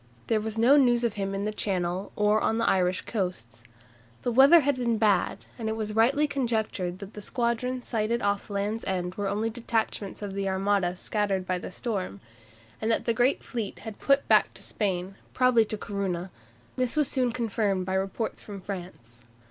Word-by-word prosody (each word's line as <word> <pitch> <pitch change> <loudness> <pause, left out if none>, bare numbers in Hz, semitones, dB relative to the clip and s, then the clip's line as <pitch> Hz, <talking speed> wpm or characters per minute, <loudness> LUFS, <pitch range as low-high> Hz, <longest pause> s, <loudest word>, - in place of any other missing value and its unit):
There 220 -2 +1
was 220 0 -4
no 250 +6 +6
news 245 -3 +4
of 235 -3 +1
him 195 -1 -3
in 200 +1 -2
the 215 - -1
Channel 185 -2 -2
or 210 +1 +3
on 225 - +1
the 230 - +1
Irish 185 -1 +2
coasts. 180 - -4 0.6
The 245 - 0
weather 275 +7 +8
had 285 +1 +2
been 235 -2 +1
bad, 215 -2 +1
and 220 -1 -2
it 220 - -1
was 215 -1 -3
rightly 265 +7 +4
conjectured 220 -10 -1
that 200 +1 -10
the 210 - -8
squadrons 245 +3 -2
sighted 230 0 0
off 200 +1 0
Land's 205 +2 -2
End 180 -1 -2
were 205 +1 -3
only 215 +3 -1
detachments 220 -3 -2
of 200 -1 -4
the 195 0 -1
Armada 190 -1 +1
scattered 195 -1 -1
by 185 -1 -1
the - - -7
storm, 190 - -4 0.6
and 220 - 0
that 225 - +1
the 230 - +2
great 245 +4 +2
fleet 225 -5 -4
had 220 -2 -7
put 275 0 +2
back - - +4
to - - -11
Spain, 190 -1 -2 0.2
probably 255 -3 +4
to 215 - -4
Corunna. 195 -4 -3 0.5
This 255 +1 0
was 300 -2 +3
soon 250 -2 +1
confirmed 215 -5 -1
by 190 - -2
reports 195 +4 -2
from 200 -2 -8
France. 175 - -8
210 Hz, 190 wpm, -27 LUFS, 195-235 Hz, 0.6 s, weather